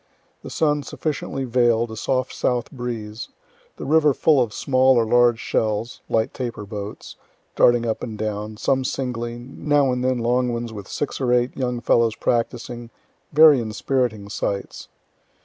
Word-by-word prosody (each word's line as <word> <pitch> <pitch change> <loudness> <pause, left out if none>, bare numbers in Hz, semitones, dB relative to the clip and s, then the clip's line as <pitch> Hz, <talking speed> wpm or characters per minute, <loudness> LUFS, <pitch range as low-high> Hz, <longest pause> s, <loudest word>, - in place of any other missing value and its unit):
The - - -9
sun 150 -2 +1
sufficiently 140 -1 -4
veil'd, 120 -2 +2
a - - -6
soft 130 +3 -1
south 120 -2 -1
breeze, 120 -4 -6 0.5
the - - -6
river 150 -2 +4
full 150 -5 +4
of 120 -3 -1
small 130 +1 +3
or 115 - +3
large 120 0 +4
shells 110 +1 -2
(light 110 0 0
taper 120 -5 -5
boats) 100 0 -8 0.4
darting 120 -1 +4
up 110 -1 -2
and 110 -3 -6
down, 105 0 -4
some 135 +3 +1
singly, 120 -3 -3
now 135 +2 0
and 125 0 -2
then 130 0 +1
long 125 +1 +1
ones 120 -1 -4
with 100 -2 -8
six 145 - -4
or 125 -2 +1
eight 125 +1 +2
young 125 -2 -2
fellows 115 -1 +2
practicing 120 0 -2 0.4
very 155 -2 +7
inspiriting 110 -1 -1
sights. 100 -1 -4
120 Hz, 155 wpm, -22 LUFS, 110-130 Hz, 0.5 s, very